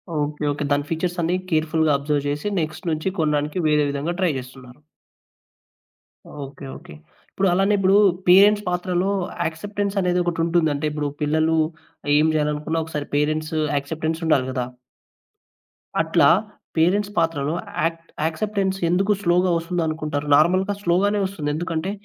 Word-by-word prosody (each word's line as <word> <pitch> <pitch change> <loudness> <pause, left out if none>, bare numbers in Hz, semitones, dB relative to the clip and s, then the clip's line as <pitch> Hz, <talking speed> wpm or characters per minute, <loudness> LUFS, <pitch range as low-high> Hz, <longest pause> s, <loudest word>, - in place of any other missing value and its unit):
Okay. 150 0 -2
Okay. 145 +1 -3
దాని 145 0 +1
ఫీచర్సన్నీ 175 +1 -1 0.2
కేర్‌ఫుల్‌గా 160 0 +2
observe 145 0 -1
జేసి 145 +6 -2
next 155 +4 -5
నుంచి 155 +4 -1
కొనడానికి 150 0 0
వేరే 150 -1 +3
విధంగా 145 +5 -2
ట్రై 185 -3 +2
జేస్తున్నారు. 130 0 -11 1.6
ఓకే. 140 0 -10
ఓకే. - - -13 0.4
ఇప్పుడు 195 - 0
అలానే 195 +3 +2
ఇప్పుడు 195 0 +3 0.3
పేరెంట్స్ 205 +3 +6
పాత్రలో 180 +1 0 0.4
యాక్సెప్టెన్సనేదొకటుంటుంది. 175 -2 0
అంటే 145 +2 -3
ఇప్పుడు 150 -1 -2
పిల్లలు 155 +2 +2 0.6
ఏం 155 +1 +4
జేయాలనుకున్న, 150 +2 -1
ఒకసారి 150 -2 -5
పేరెంట్స్ 155 +2 0 0.2
యాక్సెప్టెన్సుండాలి 160 -1 0
గదా! 125 -1 -2 1.4
అట్లా, - - +3 0.5
పేరెంట్స్ 195 +5 +2
పాత్రలో 165 -2 0 0.3
యాక్ట్ 165 0 -3 0.2
యాక్సెప్టెన్స్ 195 +3 -1
ఎందుకు 190 +4 +2
స్లోగా 180 +1 +3
ఒస్తుందనుకుంటారు? 160 -4 -2
నార్మల్‌గా 185 +6 +3
స్లోగానే 200 +4 +2
ఒస్తుంది. 185 -6 -4
ఎందుకంటే, 165 +2 -2
160 Hz, 115 wpm, -22 LUFS, 150-180 Hz, 1.6 s, పేరెంట్స్